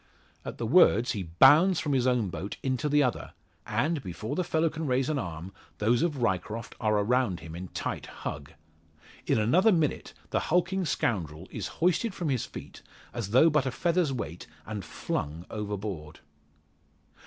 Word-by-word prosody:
At - - -7
the - - -3
words 115 +8 +5
he 105 - -3
bounds 145 - +5
from 145 -2 -1
his 130 -1 +2
own 120 -6 +2
boat 85 +6 -5
into 135 +3 0
the 145 0 +4
other; 125 -3 -2 0.3
and, 155 0 0
before 95 +2 -5
the 185 - 0
fellow 165 -1 +1
can 155 0 -3
raise 130 +1 +1
an 150 -2 0
arm, 85 -1 -6 0.2
those 115 +3 +2
of 145 -7 0
Ryecroft 110 +3 -2
are 110 -2 +2
around 110 -2 +1
him 80 - -9
in 90 +2 -6
tight - - -4
hug. 70 +2 -7 0.8
In - - +3
another 170 - +4
minute 160 -6 0 0.2
the - - +2
hulking 180 +2 +1
scoundrel 85 - -2
is 105 -5 -4 0.2
hoisted 185 +4 +2
from 170 -5 -2
his 130 -4 0
feet, - - -10 0.3
as 115 -5 -4
though 130 +9 +6
but 145 -3 +2
a - - 0
feather's 170 0 +1
weight, 90 -10 -5 0.2
and 105 -3 -5
flung 80 +1 -4
overboard. 100 -8 -5
120 Hz, 170 wpm, -28 LUFS, 95-155 Hz, 0.8 s, though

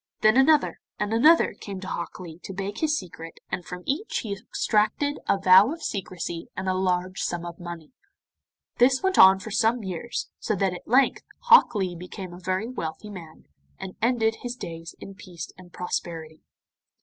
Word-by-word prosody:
Then 215 +1 +5
another 295 +3 +4 0.2
and 210 +1 -2
another 305 +9 +5
came 195 -2 -8
to 185 - -7
Hok 170 - -5
Lee 170 -2 -9
to 195 - -8
beg 195 +1 -4
his 305 -1 +1
secret, 165 -3 -9
and 180 - -3
from 180 +1 -8
each 310 +11 -2
he 210 -3 -3
extracted 215 +6 0
a - - +4
vow 190 +5 +6
of 330 +1 -7
secrecy 175 -4 -4
and 190 0 -3
a 185 - +2
large 185 0 -1
sum 175 0 -2
of 170 -1 -8
money. 170 -3 -8 0.9
This 260 +4 +4
went 380 0 +2
on 190 0 +9
for 215 +3 -8
some 225 +2 +2
years, 190 +5 -4
so 215 - -1
that 195 -1 0
at 180 - -10
length 260 +4 +3 0.2
Hok 475 - +6
Lee 185 -3 -1
became 180 +1 -8
a 175 - -10
very 185 +4 -2
wealthy 210 -4 -6
man, 165 -5 -11 0.3
and 185 - -8
ended 225 -1 +2
his 245 0 -4
days 165 -7 -8
in 195 - -9
peace 185 -5 -9
and 180 -1 -15
prosperity. 165 -3 -5
190 Hz, 185 wpm, -25 LUFS, 175-230 Hz, 0.9 s, on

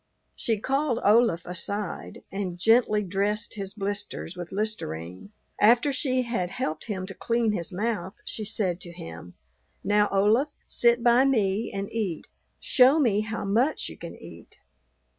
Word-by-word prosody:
She 225 -3 -1
called 270 +1 0
Olaf 210 -5 +4
aside 195 +2 -5
and 190 -3 -3
gently 220 +1 +3
dressed 205 +4 -1
his 200 -1 -6
blisters 200 -3 -4
with 175 -1 -7
listerine; 95 - -4 0.3
after 240 +6 +5
she 255 -1 +1
had 230 -7 -2
helped 155 -9 -3
him 190 -4 -3
to 190 - -7
clean 230 +2 0
his 175 -3 -3
mouth 200 -1 -2
she 220 - -3
said 195 -4 -1
to 175 - -9
him, 85 - -10 0.5
"Now, 210 0 +3
Olaf, 215 +9 +3 0.2
sit 235 0 +3
by 245 +2 +5
me 215 -5 +1
and 195 0 -3
eat; 205 -8 -2 0.3
show 260 +3 +5
me 230 -9 +3
how 220 0 -4
much 235 +10 +1
you - - -9
can - - -8
eat. - - -13
210 Hz, 150 wpm, -26 LUFS, 190-235 Hz, 0.5 s, after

